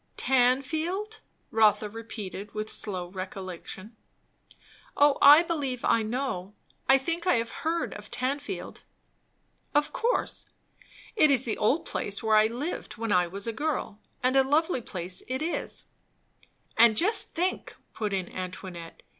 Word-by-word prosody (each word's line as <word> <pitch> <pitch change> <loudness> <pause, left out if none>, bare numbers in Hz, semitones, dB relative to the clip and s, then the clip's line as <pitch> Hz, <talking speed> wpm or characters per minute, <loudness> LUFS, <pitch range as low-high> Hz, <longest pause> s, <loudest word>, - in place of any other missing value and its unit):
"Tanfield 310 - +1 0.2
" - - -43
Rotha 215 -1 +4
repeated 210 -2 -8
with 215 0 -3
slow 185 -4 -2
recollection. 185 +2 -7 1.0
"O 285 -1 +5
I 295 +4 +9
believe 285 -7 -2
I 230 - +3
know. 215 -4 -3 0.3
I 270 - +8
think 335 +6 -3
I 360 - +5
have 230 0 -1
heard 335 +1 -1
of 210 0 -10
Tanfield." 280 +3 -3 0.9
"Of 295 0 +2
course. 480 +2 -1 0.7
It 310 -9 +5
is 265 -2 +3
the 225 - -1
old 265 +10 +2
place 200 +2 -4
where 220 -1 +3
I 215 0 +6
lived 250 +8 -5
when 225 -1 -2
I 180 -2 +3
was 195 +3 -5
a 230 - -2
girl; 285 -6 -3 0.2
and 255 +1 +2
a 270 - +6
lovely 295 +1 +1
place 180 -4 -3
it 260 +3 -2
is." 335 - -2 0.9
"And 225 -1 +6
just 425 - +1
think!" 360 +3 -2 0.2
put 210 -2 -3
in 190 -2 -1
Antoinette. 185 -2 -8
235 Hz, 145 wpm, -28 LUFS, 205-290 Hz, 1.0 s, I